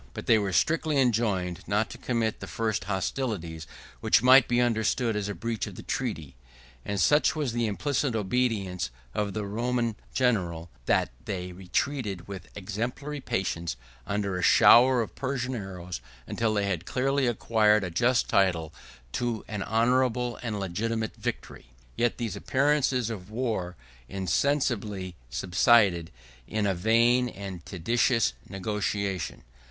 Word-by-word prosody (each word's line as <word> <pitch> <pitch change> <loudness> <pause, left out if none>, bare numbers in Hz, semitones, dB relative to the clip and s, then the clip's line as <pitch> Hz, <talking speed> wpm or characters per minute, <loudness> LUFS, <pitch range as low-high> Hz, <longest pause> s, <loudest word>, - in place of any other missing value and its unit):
But - - -6
they 110 - +5
were 100 -2 -1
strictly 155 - +2
enjoined 105 -8 +1
not 105 +2 0
to - - -9
commit 115 -3 -1
the - - -7
first 110 -5 -2
hostilities, 95 -5 -3 0.3
which 105 - +3
might 130 0 +7
be 120 0 +2
understood 115 0 +1
as 105 -1 -2
a 100 - -4
breach 115 -2 -3
of - - -9
the - - -9
treaty: 75 -3 -3 0.5
and 100 -1 -3
such 150 - +4
was 145 -6 -1
the 120 -1 0
implicit 135 +3 -1
obedience 105 - 0 0.2
of 100 -1 -1
the 105 -1 -3
Roman 115 +2 -1 0.2
general, 90 -10 0 0.2
that - - +2
they 90 -1 -4
retreated, 95 +2 -2
with 100 -2 -8
exemplary 120 +9 -4
patience, 85 - -2 0.3
under 100 -2 -1
a - - -2
shower 125 +4 +7
of - - -9
Persian 130 -1 -2
arrows 90 - -6 0.3
till 110 -2 +1
they 100 -1 +1
had 95 -4 -2
clearly 135 +1 +1
acquired 110 -2 +3
a 90 - -3
just 120 +8 +2
title 85 -5 +1 0.4
to 120 -3 -2
an 105 -2 -4
honorable 125 +2 +1
and 110 -4 -3
legitimate 110 +4 -2
victory. 60 - -6 0.2
Yet 120 -1 +1
these 115 -5 -3
appearances 130 -4 +1
of 95 -3 -7
war 110 -6 -2 0.3
insensibly 100 - 0 0.2
subsided 90 - +3 0.4
in 110 -1 -1
a 100 - +2
vain 115 +6 +3
and 95 -5 -7
tedious 115 +4 +1 0.2
negotiation. 100 -1 -2
110 Hz, 140 wpm, -27 LUFS, 95-120 Hz, 0.5 s, might